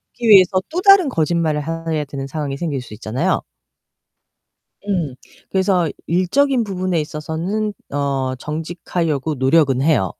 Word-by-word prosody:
듣기 235 -1 -1
위해서 190 -2 +7
또 345 +3 -2
다른 395 -4 +7
거짓말을 160 - 0
해야 165 -2 -2
되는 135 -1 -6
상황이 140 -2 -4
생길 145 -6 -3
수 125 - -11
있잖아요. 115 +4 -1 1.5
음 165 -9 -1 0.4
그래서 190 -3 +2 0.2
일적인 245 - +2
부분에 185 -4 -1
있어서는 165 +8 -3 0.2
어, 135 -2 -1
정직하려고 160 -1 -3
노력은 135 0 +3
해요. 135 - +2
160 Hz, 300 characters per minute, -19 LUFS, 140-185 Hz, 1.5 s, 위해서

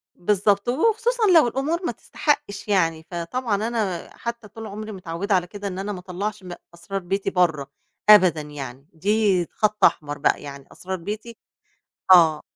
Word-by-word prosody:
بالضبط، 200 +3 +1
وخصوصًا 455 - +1
لو 305 -7 +7
الأمور 305 +9 -2
ما - - 0
تستحقش 210 -10 -2
يعني، 165 -6 +1
فطبعًا 205 +5 -2
أنا 210 -7 -2
حتّى 235 -2 -6
طول 225 +1 -9
عمري 215 +1 -7
متعودة 190 +1 -2
على 180 -1 0
كده 205 +1 -7
إن 185 -1 -5
أنا 200 +2 -3
ما 185 - -5
أطلّعش 190 +3 -5
م 180 - -9 0.2
أسرار 195 +3 -5
بيتي 195 +3 -2
برّا 160 -6 +1 0.4
أبدًا 185 -7 +7
يعني، 140 -2 -9
دي 195 +1 +1
خَط 215 0 -1
أحمر 145 -2 +1
بقى، 145 - +1
يعني 140 -1 -9
أسرار 190 +1 -5
بيتي 215 +6 -7 0.8
آه. 160 -4 +6
195 Hz, 160 wpm, -23 LUFS, 170-215 Hz, 0.8 s, لو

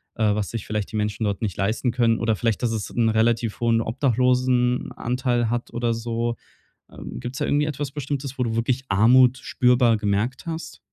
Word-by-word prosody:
äh, 105 -2 +2
was 105 -2 -2
sich 115 - -5
vielleicht 105 -2 -3
die 110 - -3
Menschen 105 +1 -2
dort 100 0 -2
nicht 100 -6 -2
leisten 110 +5 0
können 115 -2 +2
oder 115 -1 +1
vielleicht, 115 -2 -1
dass 120 - +1
es 110 -2 -3
'n 115 -2 +1
relativ 115 0 +1
hohen 115 -1 +3
Obdachlosenanteil 125 0 +1
hat 120 0 -3
oder 120 0 0
so. 115 +1 -2 0.6
Ähm, - - -8
gibt's 125 +2 -6
da - - +1
irgendwie 150 +1 +2
etwas 145 -2 -3
Bestimmtes, 140 -2 -4
wo 125 - +1
du 115 -1 -2
wirklich 125 +3 0
Armut 125 +6 +5
spürbar 125 -2 +3
gemerkt 105 +6 -1
hast? 160 -1 -6
120 Hz, 185 wpm, -23 LUFS, 110-125 Hz, 0.6 s, Armut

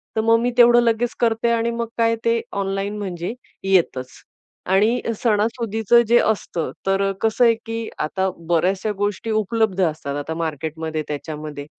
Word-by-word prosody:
तर 220 - +2
मग 230 +1 +4
मी 245 +1 +1
तेवढं 240 0 +7
लगेच 230 +1 +1
करते. 230 0 +1
आणि 235 0 +1
मग 235 0 -3
काय, 230 0 +3
ते 230 0 +3 0.2
ऑनलाईन 195 +2 -2
म्हणजे 180 0 -4 0.3
येतंच. 170 -10 +1 0.5
आणि 210 +6 +2 0.2
सणासुदीचं 225 0 +2
जे 240 +1 +5
असतं, 195 -6 -1 0.2
तर 195 0 +2
कसं 225 +2 +2
आहे, 230 -1 +5
की 225 0 -4
आता 190 +5 -1 0.2
बऱ्याचशा 185 +5 +1
गोष्टी 205 +2 -2
उपलब्ध 215 -2 0
असतात 150 -4 -2
आता 145 +3 -4
मार्केटमध्ये, 160 +1 -3
त्याच्यामध्ये. 150 -1 -6
205 Hz, 150 wpm, -21 LUFS, 170-230 Hz, 0.5 s, तेवढं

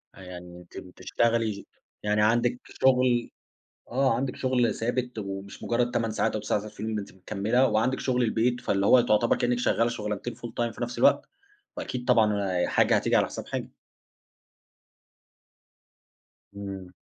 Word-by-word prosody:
آه - - -15
يعني 90 -1 -10
أنتِ 90 -1 -14
بتشتغلي 115 +4 -1
ش 100 - -9 0.4
يعني 105 0 +1
عندِك 120 +3 +2
شغل 125 -2 +2 0.6
آه، 130 -1 +2
عندِك 130 +1 -3
شغل 125 -4 +1
ثابت 120 0 -2
ومش 100 -1 -6
مجرد 120 +1 0
8 115 -2 -1
ساعات 110 - 0
أو 110 - -1
9 105 - 0
ساعات 105 +1 -8
في - - -12
اليوم، 110 +1 -3
ده 105 - -1
أنتِ 100 - -10
مكملة 105 +7 +1
وعندِك 120 +5 +1
شغل 125 -1 0
البيت 120 +2 +1
فاللي 100 -3 0
هو 130 - +7
تعتبر 110 0 +2
كأنِك 125 -1 0
شغالة 115 -1 +2
شغلانتين 105 0 -4
full 120 - -8
time 120 -1 0
في - - -7
نفس 120 +1 -4
الوقت، - - +4 0.5
وأكيد 125 -1 -4
طبعًا 105 -7 +2
حاجة - - +3
هتيجي - - +2
على - - +3
حساب - - -7
حاجة. - - -4 2.9
إمم. 95 -2 -7
115 Hz, 160 wpm, -27 LUFS, 100-120 Hz, 2.9 s, هو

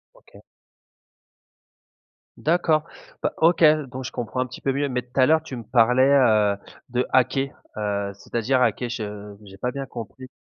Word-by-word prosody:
OK. - - -19 2.0
D'accord. 160 -2 +2 0.4
Bah, - - 0
OK, 165 +1 +3 0.3
donc 130 0 -7
je - - -6
comprends 125 +2 -3
un - - 0
petit 130 - -10
peu 135 - -1
mieux, 140 0 -1
mais 125 -1 -1
tout 125 +2 -6
à 130 - +7
l'heure 160 +2 +4
tu 135 -5 -8
me 120 - -7
parlais, 125 +3 +3
heu, 110 -7 +4 0.3
de 125 +1 0
hacker, 135 +2 +2 0.3
heu, 100 -1 -2
c'est-à-dire, 120 +5 -1
hacker? 120 +1 +1
Je 105 -3 -6
j'ai 95 0 -13
pas 125 +4 -2
bien 135 +1 -5
compris. 120 +2 -9
125 Hz, 165 wpm, -23 LUFS, 110-135 Hz, 2.0 s, à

